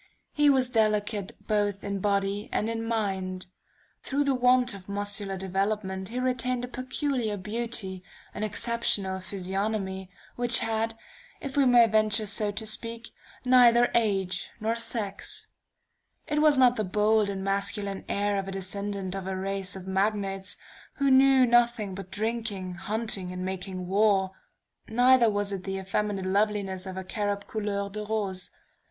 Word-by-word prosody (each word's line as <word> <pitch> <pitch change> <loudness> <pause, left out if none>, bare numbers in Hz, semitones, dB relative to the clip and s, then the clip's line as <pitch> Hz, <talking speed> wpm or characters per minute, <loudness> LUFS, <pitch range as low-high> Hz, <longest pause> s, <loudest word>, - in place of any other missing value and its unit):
He 295 -1 +4
was 260 -2 +3
delicate 210 -3 0
both 205 -2 0
in 200 -1 -3
body 200 +1 0
and 220 +2 0
in 225 0 -3
mind. 190 -5 -2 0.6
Through 280 +1 0
the 280 -1 +2
want 250 -1 +3
of 195 -1 -11
muscular 200 -1 -1
development 190 0 -2
he 245 +2 -3
retained 250 -1 -1
a - - -10
peculiar 255 -3 -2
beauty, 210 -2 -4 0.3
an - - -6
exceptional 215 -3 0
physiognomy, 190 0 -3 0.3
which 245 0 +4
had, 225 0 -1 0.4
if 275 -2 -6
we 280 -1 +4
may 240 -1 +7
venture 215 0 +2
so 210 +1 -1
to 220 +2 -2
speak, 230 +2 -4 0.4
neither 245 -1 +6
age 195 -5 0
nor 220 +1 0
sex. 225 -4 -1 0.7
It 300 0 0
was 305 -2 +6
not 250 -1 +5
the 215 - 0
bold 210 +2 +2
and 195 -1 -4
masculine 200 0 -2
air 205 0 0
of 195 - -5
a - - -4
descendant 195 0 -3
of 190 -1 -5
a 190 - -2
race 195 0 -3
of 190 -1 -8
Magnates, 195 0 -1 0.4
who 280 -1 +2
knew 265 0 +6
nothing 235 -4 +2
but 190 0 -8
drinking, 210 -2 -3
hunting 195 0 -2
and 180 0 -4
making 185 -1 -5
war; 195 0 +2 0.6
neither 245 +1 +5
was 205 -1 -1
it 190 -2 -4
the 195 0 -3
effeminate 195 0 -2
loveliness 195 -1 0
of 190 0 -6
a 190 - -4
cherub 205 +1 -2
couleur 205 -2 -2
de 210 +1 -4
rose. 200 -4 -3
205 Hz, 150 wpm, -27 LUFS, 195-230 Hz, 0.7 s, may